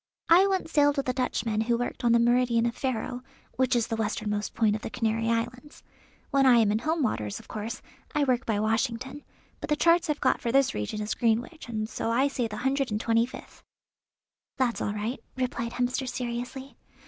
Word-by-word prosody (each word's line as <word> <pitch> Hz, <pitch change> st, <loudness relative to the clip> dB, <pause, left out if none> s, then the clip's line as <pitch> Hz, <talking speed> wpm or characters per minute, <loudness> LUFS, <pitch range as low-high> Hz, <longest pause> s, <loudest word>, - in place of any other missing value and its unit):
I 360 Hz, +4 st, +7 dB
once 380 Hz, -4 st, -1 dB
sailed 290 Hz, -1 st, +3 dB
with 275 Hz, -, -1 dB
a -, -, +1 dB
Dutchman 230 Hz, -4 st, -1 dB
who 235 Hz, +1 st, +1 dB
worked 245 Hz, +1 st, -4 dB
on 240 Hz, -, +4 dB
the 235 Hz, -, +6 dB
meridian 235 Hz, 0 st, +3 dB
of 235 Hz, -, 0 dB
Ferro, 250 Hz, -1 st, -3 dB, 0.4 s
which 255 Hz, -1 st, +2 dB
is 235 Hz, -2 st, +2 dB
the 225 Hz, -, -3 dB
westernmost 210 Hz, -1 st, -2 dB
point 220 Hz, -3 st, +3 dB
of 215 Hz, -, -5 dB
the -, -, -5 dB
Canary 225 Hz, -1 st, -1 dB
Islands. 245 Hz, +5 st, -3 dB, 0.5 s
When 275 Hz, -1 st, +4 dB
I 245 Hz, -2 st, +7 dB
am 220 Hz, -3 st, +4 dB
in 215 Hz, -, +1 dB
home 315 Hz, +4 st, 0 dB
waters 105 Hz, -, -2 dB
of -, -, -16 dB
course 220 Hz, +3 st, -5 dB, 0.3 s
I 295 Hz, -, +3 dB
work 255 Hz, -2 st, +1 dB
by 215 Hz, -2 st, -1 dB
Washington, 230 Hz, +5 st, -1 dB, 0.4 s
but -, -, -6 dB
the 300 Hz, -, +3 dB
charts 335 Hz, +2 st, +3 dB
I've 295 Hz, -, 0 dB
got 260 Hz, -, +2 dB
for 235 Hz, -, -1 dB
this 275 Hz, +1 st, +3 dB
region 105 Hz, -, -3 dB
is 210 Hz, 0 st, -2 dB
Greenwich, 240 Hz, +6 st, -1 dB
and 215 Hz, -2 st, -2 dB
so 225 Hz, -, -3 dB
I 260 Hz, +5 st, +2 dB
say 250 Hz, -4 st, -1 dB
the 210 Hz, -1 st, -7 dB
hundred 270 Hz, +2 st, 0 dB
and 210 Hz, 0 st, -1 dB
twenty 230 Hz, +1 st, +2 dB
fifth." -, -, -12 dB, 1.0 s
"That's 250 Hz, -3 st, 0 dB
all 205 Hz, -, -1 dB
right," 220 Hz, +5 st, -3 dB, 0.2 s
replied 240 Hz, -2 st, -2 dB
Hemster 250 Hz, +1 st, -1 dB
seriously. 245 Hz, +1 st, -5 dB
240 Hz, 205 wpm, -27 LUFS, 225-265 Hz, 1.0 s, I